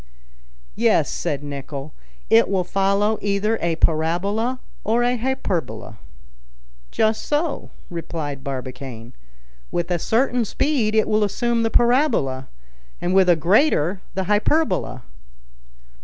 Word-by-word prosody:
"Yes," -, -, +2 dB
said 145 Hz, 0 st, -3 dB
Nicholl, 140 Hz, 0 st, -6 dB, 0.3 s
"it 115 Hz, -, +5 dB
will 190 Hz, -2 st, +1 dB
follow 200 Hz, +3 st, +1 dB
either 205 Hz, +2 st, 0 dB
a 170 Hz, -1 st, 0 dB
parabola 180 Hz, +11 st, 0 dB, 0.2 s
or 230 Hz, +3 st, +2 dB
a 245 Hz, +1 st, +2 dB
hyperbola." 180 Hz, -, -3 dB, 0.9 s
"Just 220 Hz, -, +1 dB
so," 295 Hz, +1 st, -1 dB, 0.2 s
replied 155 Hz, -5 st, -5 dB
Barbicane. 130 Hz, -3 st, -6 dB, 0.6 s
"With 175 Hz, +1 st, -2 dB
a 175 Hz, -, +1 dB
certain 245 Hz, -, +1 dB
speed 225 Hz, -2 st, 0 dB
it 220 Hz, -, +3 dB
will 215 Hz, 0 st, +2 dB
assume 230 Hz, +3 st, 0 dB
the 225 Hz, -, +1 dB
parabola, 235 Hz, -, +2 dB, 0.5 s
and 175 Hz, +1 st, -1 dB
with 190 Hz, -1 st, +5 dB
a 175 Hz, -, +6 dB
greater 185 Hz, -, +2 dB
the 190 Hz, -, 0 dB
hyperbola." 210 Hz, -, +1 dB
195 Hz, 115 wpm, -22 LUFS, 155-225 Hz, 0.9 s, a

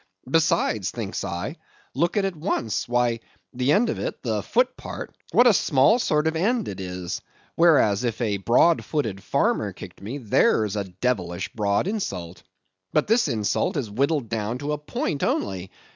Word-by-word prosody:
Besides,' 130 Hz, -, +2 dB
thinks 110 Hz, -4 st, -4 dB
I, 100 Hz, -, -4 dB, 0.4 s
'look 170 Hz, +8 st, 0 dB
at 200 Hz, -, +2 dB
it 190 Hz, -2 st, -2 dB
once; 130 Hz, -, -2 dB
why, 120 Hz, -1 st, +1 dB, 0.3 s
the 125 Hz, +2 st, +1 dB
end 220 Hz, +9 st, +4 dB
of -, -, -2 dB
it—the -, -, -2 dB
foot -, -, +1 dB
part—what 245 Hz, -, -1 dB
a 240 Hz, -, +7 dB
small 165 Hz, -, +4 dB
sort 150 Hz, -8 st, +1 dB
of 160 Hz, 0 st, +1 dB
end 220 Hz, +7 st, +1 dB
it 95 Hz, -, -6 dB
is; 90 Hz, -1 st, -5 dB, 0.3 s
whereas, 140 Hz, -11 st, +4 dB
if 115 Hz, -3 st, -2 dB
a 105 Hz, -5 st, 0 dB
broad 120 Hz, -, +3 dB
footed 110 Hz, -11 st, -2 dB
farmer -, -, 0 dB
kicked -, -, -11 dB
me, 115 Hz, +8 st, -5 dB
there's 110 Hz, -3 st, +2 dB
a 100 Hz, -1 st, -1 dB
devilish 95 Hz, -2 st, -2 dB
broad 100 Hz, -2 st, +1 dB
insult. 95 Hz, -, -4 dB, 0.5 s
But 150 Hz, -, +2 dB
this 225 Hz, -2 st, +3 dB
insult 110 Hz, -1 st, 0 dB
is 120 Hz, -7 st, -3 dB
whittled 140 Hz, +3 st, 0 dB
down 115 Hz, +1 st, -2 dB
to 145 Hz, +3 st, -3 dB
a 150 Hz, -, -3 dB
point 150 Hz, -, -3 dB
only. 95 Hz, -2 st, -1 dB
125 Hz, 165 wpm, -24 LUFS, 100-160 Hz, 0.5 s, a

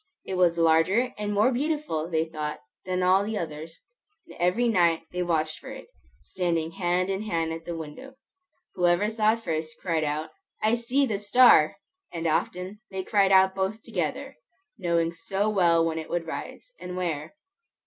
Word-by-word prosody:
It -, -, -5 dB
was 175 Hz, -2 st, +3 dB
larger 165 Hz, +10 st, +3 dB
and 210 Hz, 0 st, -3 dB
more 210 Hz, +5 st, +3 dB
beautiful, 270 Hz, -, -2 dB
they 160 Hz, -2 st, +1 dB
thought, 155 Hz, -2 st, -5 dB, 0.2 s
than 185 Hz, 0 st, -1 dB
all 185 Hz, +2 st, +4 dB
the 215 Hz, +1 st, -3 dB
others, 160 Hz, -1 st, -6 dB, 0.4 s
and -, -, -14 dB
every 180 Hz, +8 st, +2 dB
night 170 Hz, -7 st, +3 dB
they 180 Hz, -, -3 dB
watched 160 Hz, -3 st, -1 dB
for -, -, -10 dB
it, -, -, -10 dB, 0.3 s
standing 165 Hz, -, -2 dB
hand 180 Hz, +1 st, 0 dB
in 195 Hz, +1 st, -2 dB
hand 165 Hz, -6 st, -1 dB
at 165 Hz, 0 st, -8 dB
the 170 Hz, -1 st, -4 dB
window. 165 Hz, -, -9 dB, 0.6 s
Whoever 180 Hz, +4 st, +2 dB
saw 215 Hz, -1 st, +3 dB
it 230 Hz, 0 st, -6 dB
first, 155 Hz, -2 st, -4 dB
cried 165 Hz, -4 st, -1 dB
out, 150 Hz, +1 st, -2 dB, 0.3 s
"I 215 Hz, +1 st, +2 dB
see 245 Hz, +4 st, +1 dB
the 210 Hz, -6 st, -2 dB
star!" 205 Hz, -7 st, +6 dB, 0.4 s
And 170 Hz, -1 st, -5 dB
often 180 Hz, +5 st, -1 dB
they 190 Hz, -1 st, -4 dB
cried 195 Hz, 0 st, +2 dB
out 190 Hz, 0 st, +6 dB
both 195 Hz, +3 st, -2 dB
together, -, -, -4 dB, 0.4 s
knowing 170 Hz, -2 st, 0 dB
so 195 Hz, +4 st, -2 dB
well 170 Hz, -5 st, +3 dB
when 160 Hz, -1 st, -1 dB
it 160 Hz, -, -8 dB
would 175 Hz, -1 st, -2 dB
rise, 165 Hz, -, -7 dB
and 180 Hz, 0 st, -6 dB
where. 160 Hz, -, -3 dB
180 Hz, 175 wpm, -26 LUFS, 165-205 Hz, 0.6 s, star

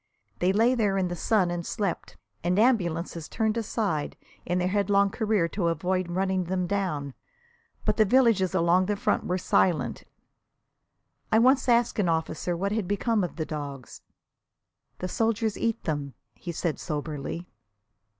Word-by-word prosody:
They 180 Hz, +1 st, +3 dB
lay 225 Hz, +5 st, +3 dB
there 210 Hz, -5 st, +1 dB
in 185 Hz, -2 st, 0 dB
the 175 Hz, -, -3 dB
sun 185 Hz, 0 st, +1 dB
and 175 Hz, -1 st, -3 dB
slept, 195 Hz, +1 st, -3 dB, 0.3 s
and 180 Hz, +2 st, +1 dB
ambulances 175 Hz, -8 st, +1 dB
turned 220 Hz, -1 st, 0 dB
aside 210 Hz, -8 st, -2 dB, 0.3 s
in 180 Hz, -, 0 dB
their 180 Hz, 0 st, +1 dB
headlong 200 Hz, 0 st, +2 dB
career 215 Hz, -6 st, +1 dB
to 180 Hz, -2 st, -1 dB
avoid 180 Hz, +2 st, -1 dB
running 185 Hz, +1 st, 0 dB
them 185 Hz, +1 st, -1 dB
down. 175 Hz, -8 st, -2 dB, 0.7 s
But -, -, +1 dB
the 215 Hz, -, +5 dB
villages 210 Hz, -5 st, +3 dB
along 180 Hz, +1 st, +3 dB
the 205 Hz, -, 0 dB
front 200 Hz, -, 0 dB
were 180 Hz, -, 0 dB
silent. 180 Hz, -2 st, +1 dB, 1.3 s
I 220 Hz, -, +5 dB
once 260 Hz, +3 st, +4 dB
asked 235 Hz, -1 st, +3 dB
an 185 Hz, -4 st, +2 dB
officer 165 Hz, +1 st, -1 dB
what 195 Hz, +3 st, -1 dB
had 210 Hz, -3 st, -1 dB
become 205 Hz, +2 st, +1 dB
of 175 Hz, -, -4 dB
the 160 Hz, -, -3 dB
dogs. 145 Hz, -4 st, -7 dB, 1.0 s
"The 185 Hz, -, -4 dB
soldiers 225 Hz, +2 st, 0 dB
eat 230 Hz, -1 st, -1 dB
them!" 145 Hz, -5 st, -3 dB, 0.2 s
he 175 Hz, -, -7 dB
said 165 Hz, -1 st, -2 dB
soberly. 150 Hz, +1 st, -4 dB
185 Hz, 155 wpm, -27 LUFS, 170-215 Hz, 1.3 s, the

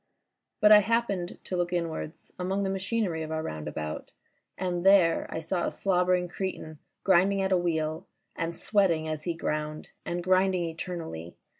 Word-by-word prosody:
But 210 Hz, 0 st, +7 dB
I 210 Hz, -, +11 dB
happened 210 Hz, -5 st, 0 dB
to 185 Hz, -, -4 dB
look 175 Hz, -1 st, 0 dB
inwards 165 Hz, -2 st, -4 dB
among 190 Hz, +2 st, -1 dB
the 195 Hz, -, 0 dB
machyiery 195 Hz, -3 st, -1 dB
of 155 Hz, -, -6 dB
our 160 Hz, 0 st, -2 dB
roundabout, 75 Hz, -, -5 dB, 0.4 s
and 180 Hz, -2 st, -2 dB
there 190 Hz, -4 st, +5 dB
I -, -, -3 dB
saw 170 Hz, +2 st, -1 dB
a -, -, -2 dB
slobbering 180 Hz, -1 st, +1 dB
cretin 175 Hz, -4 st, -5 dB, 0.2 s
grinding 195 Hz, +1 st, +4 dB
at 190 Hz, -, 0 dB
a 185 Hz, -, +5 dB
wheel 160 Hz, -3 st, -1 dB, 0.3 s
and 165 Hz, 0 st, -3 dB
sweating 180 Hz, -7 st, +1 dB
as 155 Hz, -1 st, -4 dB
he 170 Hz, -2 st, -1 dB
ground, 155 Hz, -1 st, -3 dB
and 175 Hz, 0 st, -3 dB
grinding 185 Hz, 0 st, +3 dB
eternally. 160 Hz, -, -6 dB
175 Hz, 160 wpm, -28 LUFS, 160-190 Hz, 0.4 s, I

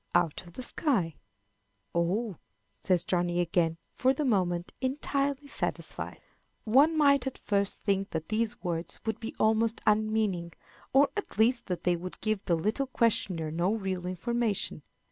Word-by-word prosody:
"Out 175 Hz, +1 st, +1 dB
of 170 Hz, -, -14 dB
the 255 Hz, -, -7 dB
sky." 230 Hz, -, 0 dB, 0.8 s
"Oh!" 185 Hz, +3 st, 0 dB, 0.4 s
says 180 Hz, -3 st, +1 dB
Johnny 175 Hz, -1 st, +1 dB
again, 170 Hz, -1 st, +1 dB, 0.2 s
for 260 Hz, +1 st, +2 dB
the 300 Hz, -, -1 dB
moment 180 Hz, -7 st, +1 dB
entirely 275 Hz, +1 st, -1 dB
satisfied. 285 Hz, -, -4 dB, 0.4 s
One 280 Hz, +8 st, +5 dB
might 280 Hz, -3 st, +4 dB
at 265 Hz, -, -4 dB
first 200 Hz, -1 st, 0 dB
think 195 Hz, -1 st, +1 dB
that 160 Hz, -1 st, -4 dB
these 220 Hz, 0 st, -1 dB
words 170 Hz, -1 st, -3 dB
would 220 Hz, -2 st, -1 dB
be 225 Hz, -, -6 dB
almost 220 Hz, +1 st, +2 dB
unmeaning, 210 Hz, -5 st, +1 dB, 0.4 s
or, 275 Hz, +1 st, +5 dB
at 415 Hz, -, -4 dB
least, 235 Hz, +3 st, +3 dB
that 180 Hz, -2 st, -3 dB
they 175 Hz, -1 st, +3 dB
would 180 Hz, +2 st, -7 dB
give 215 Hz, -2 st, -1 dB
the 170 Hz, -, +3 dB
little 215 Hz, -, 0 dB
questioner 200 Hz, -10 st, +1 dB
no 175 Hz, +6 st, +1 dB
real 190 Hz, -4 st, -3 dB
information. 215 Hz, +3 st, -1 dB
210 Hz, 150 wpm, -29 LUFS, 175-240 Hz, 0.8 s, One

